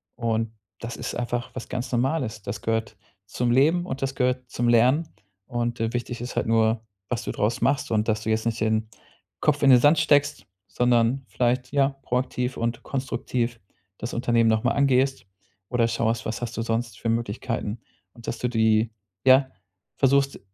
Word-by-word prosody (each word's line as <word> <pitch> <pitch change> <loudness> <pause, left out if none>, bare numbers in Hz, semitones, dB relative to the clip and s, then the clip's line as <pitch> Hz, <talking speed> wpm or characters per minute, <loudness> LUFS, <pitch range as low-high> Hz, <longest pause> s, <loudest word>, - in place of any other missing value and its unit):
und 115 -2 -1 0.3
das 115 0 -6
ist - - -4
einfach 120 0 -3
was 130 - -7
ganz 125 0 -4
Normales. 125 -3 0
Das 100 - -5
gehört 115 -1 -2 0.3
zum 120 +4 -1
Leben 160 +8 +3
und 135 -5 -5
das 135 0 -2
gehört 125 -1 0
zum 120 0 -1
Lernen. 130 +8 +4 0.4
Und, 120 -1 -2
äh, 115 +1 -1
wichtig 120 0 -3
ist 125 - -6
halt - - 0
nur, 110 0 +2 0.3
was 120 - -2
du - - -3
daraus 110 +2 -1
machst 140 -3 +1
und 110 0 +1
dass 110 0 +1
du 110 - -3
jetzt 110 +1 0
nicht 115 0 -1
den 110 0 +1 0.5
Kopf 145 -1 +2
in 140 - +6
den 125 - +8
Sand 145 +5 +5
steckst, 145 -2 +2 0.2
sondern 120 +3 +2
vielleicht, 125 +4 0
ja, 140 -1 +4
proaktiv 125 0 -1
und 115 0 -2
konstruktiv 120 -3 -2 0.4
das 120 - -5
Unternehmen 120 -2 +2
noch 110 0 +2
mal - - +2
angehst 135 -3 +2 0.4
oder 120 -1 +2
schaust, 115 0 -1
was 110 +2 -3
hast 120 -1 -5
du - - 0
sonst 115 -2 -2
für 115 - -2
Möglichkeiten? 115 0 -2 0.3
Und, 120 - -14
dass - - -3
du 125 - 0
die, 110 -1 +2 0.3
ja 130 0 +6 0.5
versuchst, 140 0 +2
120 Hz, 180 wpm, -25 LUFS, 115-130 Hz, 0.5 s, den